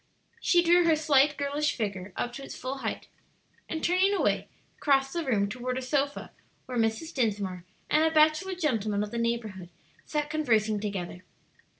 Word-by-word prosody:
She 345 -1 +3
drew 350 +1 +5
her 325 -1 +5
slight, 295 -1 +3
girlish 285 +1 0
figure 200 -4 -4
up 245 - -3
to 275 - -7
its - - -8
full 265 +2 -4
height, - - -4 0.6
and 320 - -4
turning 375 +3 +3
away, - - +1 0.3
crossed 270 -2 +2
the 340 -1 -1
room 215 -8 +1
toward 250 +4 -4
a - - -2
sofa 280 +2 -1 0.3
where 250 -2 -3
Mrs. 225 +9 -1
Dinsmore 200 - -1 0.2
and 305 +1 +3
a 320 - +4
bachelor 315 +4 +3
gentleman 220 - 0
of 210 - -6
the 235 - -3
neighborhood 220 -6 -2 0.3
sat 300 -1 -2
conversing 220 -9 +1
together. 185 -3 -5
265 Hz, 170 wpm, -28 LUFS, 215-310 Hz, 0.6 s, drew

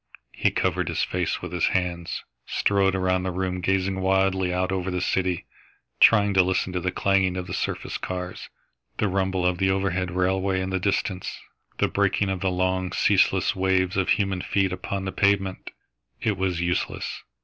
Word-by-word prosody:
He - - +2
covered - - 0
his - - 0
face - - -2
with - - -5
his - - +2
hands, 85 -2 -3 0.2
strode 100 -1 +2
around 95 0 +1
the 95 - -2
room, 90 0 -2
gazing 95 +1 0
wildly 95 -1 +2
out 90 +1 0
over 95 -1 -1
the 90 -1 -1
city, 90 -1 0 0.5
trying 105 -3 +6
to 95 - +6
listen 95 0 0
to 90 - 0
the 90 +1 -1
clanging 95 -1 +1
of 90 - -3
the - - -6
surface - - -3
cars, 90 -1 -5 0.5
the 105 - +1
rumble 95 -1 0
of 90 -1 +1
the 95 -1 +2
overhead 95 -1 0
railway 95 +1 0
in 95 0 -3
the 95 - 0
distance, 95 0 -1 0.4
the - - +2
breaking 100 0 +1
of 95 -1 -2
the 95 0 0
long, 95 0 0
ceaseless - - +2
waves 95 -1 +1
of 95 -1 0
human 95 -2 +1
feet 95 -1 0
upon 95 +1 -4
the 95 - -2
pavement. 95 -1 +1 0.5
It 105 - 0
was 95 -2 -1
useless. 90 +1 -2
95 Hz, 180 wpm, -25 LUFS, 90-95 Hz, 0.5 s, trying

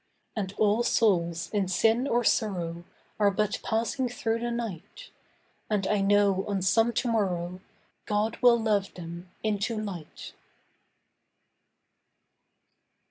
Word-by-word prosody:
And 195 -4 -2
all 215 +2 +3
souls 175 -8 +1
in 200 -3 +1
sin 225 +7 +2
or 240 -2 +1
sorrow 175 -7 0 0.3
Are 205 -1 +5
but 210 +1 -1
passing 235 +3 -1
through 230 -1 -1
the 240 +1 -2
night, 235 - -6 0.6
And 205 -3 0
I 210 0 +1
know 200 -1 +3
on 195 -2 -1
some 225 +5 +3
to 250 - 0
morrow 185 -5 -1 0.5
God 210 +1 0
will 240 -1 +6
love 210 -3 0
them 170 +1 -8
into 215 +1 -1
light. 190 -8 -7
210 Hz, 120 wpm, -28 LUFS, 190-225 Hz, 0.6 s, will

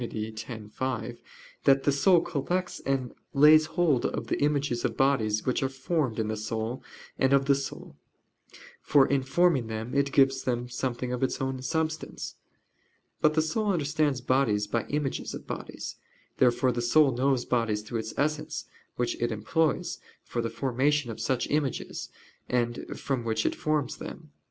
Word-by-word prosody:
x, 110 -1 -4 0.3
5) 125 -1 -3 0.4
that 135 0 +5
the 145 - +3
soul 170 +5 +5
"collects 175 +4 -2
and 135 -3 0 0.2
lays 155 +2 +7
hold 160 -6 +2
of - - -2
the - - -2
images 145 -4 +1
of 115 - -1
bodies 115 -6 +2
which 130 - +1
are 135 - +1
formed 135 -1 -1
in 110 -2 0
the 110 - -1
soul 110 +3 -3 0.4
and 135 +1 +3
of 135 0 +4
the 140 - +5
soul: 140 0 -5 0.9
for 140 -2 +5
in 140 -1 +1
forming 135 -2 +2
them 110 +2 -5
it 140 0 +2
gives 135 -1 +4
them 120 -1 -1
something 125 0 -3
of 125 - -3
its 130 - 0
own 130 -1 -2
substance." 160 +2 -3 0.9
But 155 0 +4
the 155 - +3
soul 210 +7 -1
understands 145 -4 0
bodies 120 -5 +2
by 115 +2 -2
images 145 -2 -2
of - - -9
bodies. - - -6 0.4
Therefore 125 0 +3
the 120 0 -2
soul 135 +4 +5
knows 130 0 +1
bodies 115 -4 0
through 115 +1 -3
its 110 0 -6
essence, 150 +1 -1 0.3
which 120 - 0
it 120 - +1
employs 155 +9 0 0.2
for 120 - -3
the 115 - -2
formation 130 +3 0
of 110 - -8
such 130 -2 0
images, 145 -3 -2 0.4
and 120 -1 -1
from 135 -5 -2
which 110 -1 -1
it - - +2
forms 150 -3 -1
them. 155 -3 -9
130 Hz, 165 wpm, -28 LUFS, 120-145 Hz, 0.9 s, lays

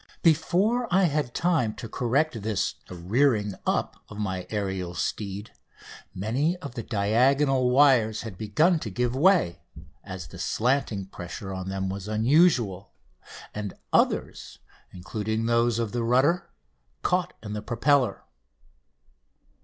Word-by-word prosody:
Before 195 +9 +2
I 190 +2 +4
had 150 -7 0
time 160 -11 +1
to 115 - -7
correct 125 +2 0
this 105 - -1 0.2
"rearing 105 +4 +1
up" - - -1
of 100 - -10
my 95 -4 -3
aerial 95 -4 -3
steed 100 +2 -4 0.6
many 135 - 0
of 140 -8 -8
the 120 - -4
diagonal 125 +6 +2
wires 125 -5 +4
had 110 -5 -7
begun 150 - +2
to 115 - -5
give 120 +5 -1
way, 165 - +3 0.4
as 95 -5 -8
the - - -11
slanting 120 -5 0
pressure 95 +1 -7
on 95 0 -5
them 95 0 -2
was 95 +1 -5
unusual, 110 - +2 0.6
and 105 -2 -5 0.2
others, - - 0 0.3
including 105 +6 -3
those 115 0 +2
of 115 -3 -2
the 120 - -2
rudder, 130 +9 +2 0.5
caught 180 0 0
in 105 -1 -6
the 105 - -4
propeller. 120 0 +1
115 Hz, 130 wpm, -26 LUFS, 100-140 Hz, 0.6 s, I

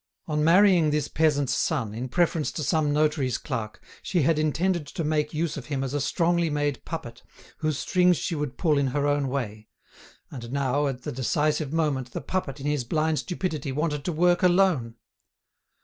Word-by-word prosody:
On 150 -1 -1
marrying 175 -1 +5
this 150 0 0
peasant's 145 -5 +1
son, 115 -6 -1
in 125 +4 -5
preference 165 0 +1
to 155 - -3
some 155 -1 +1
notary's 150 -4 +1
clerk, 115 -7 -5 0.2
she 175 -5 0
had 155 +2 +2
intended 160 +1 0
to 165 - -4
make 150 -1 0
use 155 -1 -2
of 140 - -7
him 140 -2 -2
as 135 0 -4
a 145 - 0
strongly 170 +3 +1
made 145 -2 -1
puppet, 120 -8 -6 0.4
whose 155 -3 -1
strings 180 0 +3
she 170 - -3
would 150 -4 -3
pull 155 -5 +2
in 140 - +1
her 145 - +1
own 145 -1 +1
way; 110 -5 -4 0.6
and 120 -4 -8
now, 140 +1 +1
at 130 -2 -4
the - - -4
decisive 145 +3 0
moment, 145 -6 -1
the - - -3
puppet, 145 -3 -3
in 135 - -7
his 145 -3 0
blind 155 +5 0
stupidity, 170 -6 -3
wanted 150 0 -1
to 180 - 0
work 175 +2 +3
alone! 175 -11 +3
150 Hz, 185 wpm, -26 LUFS, 135-165 Hz, 0.6 s, marrying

